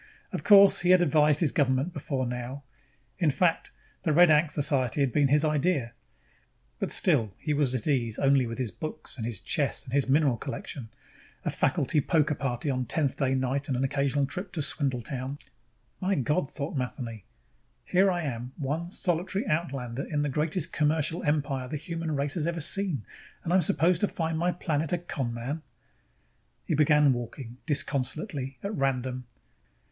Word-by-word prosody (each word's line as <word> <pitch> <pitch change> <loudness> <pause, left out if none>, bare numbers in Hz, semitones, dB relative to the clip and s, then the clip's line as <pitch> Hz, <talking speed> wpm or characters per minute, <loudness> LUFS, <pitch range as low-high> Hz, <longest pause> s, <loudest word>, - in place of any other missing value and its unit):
Of - - -3
course, 200 -2 +7
he 175 - 0
had 185 -1 +6
advised 150 -1 +3
his 160 - +3
government 140 +1 +1
before 135 -6 -2
now 125 +3 -5 0.6
in 170 -4 +3
fact, 165 +4 +1 0.3
the 160 - 0
Red 170 +2 +6
Ankh 155 +1 +4
Society 140 -3 +1
had 135 -3 +1
been 145 -2 +4
his 150 +3 +3
idea 150 -5 0 0.9
but - - -2
still 105 -5 +2
he 150 - -2
was 140 -3 +1
at 125 - -3
ease 120 -7 +1
only 135 -2 +3
with 115 - -5
his 125 -5 -2
books 155 - -6
and 115 -3 -4
his 115 -5 -3
chess 140 +6 -1
and 130 -3 -10
his 140 -1 +1
mineral 140 -3 +3
collection, 135 -2 -6 0.6
a - - 0
faculty 150 - +1
poker 150 0 +2
party 135 -1 -3
on 130 -3 -1
Tenthday 135 -1 0
night 130 +2 -1
and 130 - -1
an 130 - 0
occasional 140 +1 +1
trip 180 +6 -6
to 160 - -2
Swindletown 135 -1 -2 0.6
My 190 +1 +1
God, 145 +3 0
thought 145 +1 -5
Matheny, 120 -5 -4 0.7
_here 190 +2 +5
I 175 -2 -2
am, 125 -2 -4
one 155 +4 -2
solitary 180 +4 -1
outlander 135 -5 -2
in 145 -1 0
the 145 - -1
greatest 155 +4 0
commercial 155 +2 +1
empire 140 -3 -1
the 150 - -4
human 165 0 -4
race 140 +1 -1
has 165 -2 -1
ever 170 0 -2
seen, 165 - 0 0.4
and 170 - -1
I'm 185 - +5
supposed 165 +3 +2
to 205 - +3
find 165 -3 -2
my 175 +3 +1
planet 160 -3 -2
a - - +2
con 145 -8 -4
man!_ 125 +7 -4 1.0
He - - -1
began 150 -2 +4
walking, 120 0 -7
disconsolately, 140 - -1
at 200 +2 -3
random. 130 -4 -1
145 Hz, 170 wpm, -28 LUFS, 130-160 Hz, 1.0 s, course